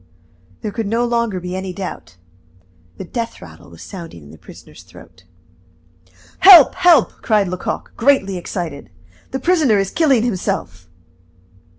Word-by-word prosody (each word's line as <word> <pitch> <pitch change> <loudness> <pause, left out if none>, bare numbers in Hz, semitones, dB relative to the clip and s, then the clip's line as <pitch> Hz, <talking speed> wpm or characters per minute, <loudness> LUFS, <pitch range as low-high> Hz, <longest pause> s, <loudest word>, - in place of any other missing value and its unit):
There 215 - -4
could 225 0 -4
no 230 +3 0
longer 235 -5 -1
be 180 +1 -6
any 190 -1 -5
doubt. 95 - -8 0.8
The - - -7
death 230 +5 -6
rattle - - -14
was - - -14
sounding 170 - -10
in 70 - -15
the 80 - -15
prisoner's - - -15
throat. - - -18 1.1
"Help! 355 -8 +8
help!" 335 -7 +3
cried 210 -3 +1
Lecoq, 180 0 -5
greatly 230 -7 +2
excited. 170 -5 -6 0.4
"The 265 - -4
prisoner 305 - +2
is 195 -1 -1
killing 275 -8 +2
himself!" 90 - -4
200 Hz, 140 wpm, -18 LUFS, 180-240 Hz, 1.1 s, Help